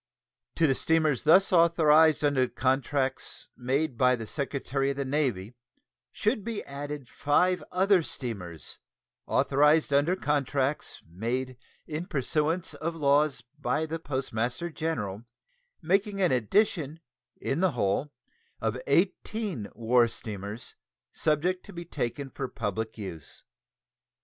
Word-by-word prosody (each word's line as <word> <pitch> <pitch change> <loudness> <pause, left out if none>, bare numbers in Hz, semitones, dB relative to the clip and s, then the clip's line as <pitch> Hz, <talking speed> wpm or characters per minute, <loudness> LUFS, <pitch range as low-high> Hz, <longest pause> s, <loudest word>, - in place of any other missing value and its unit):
To 165 - +3
the 135 - +4
steamers 155 -2 +1
thus 185 +5 +6
authorized 160 -2 +5
under 135 -3 +3
contracts 130 +1 -1
made 130 +1 -1
by 125 0 +5
the 115 -2 -6
Secretary 135 +1 -2
of 140 - -1
the 140 - -1
Navy 130 -7 -1 0.6
should 215 -1 0
be 230 -1 -4
added 145 -1 -6
five 180 +8 +1
other 190 0 +4
steamers 100 - -5 0.5
authorized 150 +2 +3
under 145 +6 +3
contracts 145 -3 -1
made 120 +9 -3 0.3
in 160 +3 -4
pursuance 155 +3 0
of 165 +1 -4
laws 145 -1 +2 0.2
by 155 +2 0
the 160 +1 -4
Postmaster 130 +1 -2
General, 115 -11 -3 0.6
making 195 +4 +1
an 185 -3 +3
addition, 155 - +1 0.4
in 135 - -1
the 185 -3 +2
whole, 120 +5 0 0.5
of - - -2
eighteen 200 - 0
war 120 +1 +4
steamers 105 0 -6 0.4
subject 170 +4 0
to 200 - -10
be 170 0 -7
taken 135 0 -4
for 135 - -4
public 110 -1 -4
use. 90 -8 -7
145 Hz, 120 wpm, -28 LUFS, 125-160 Hz, 0.6 s, thus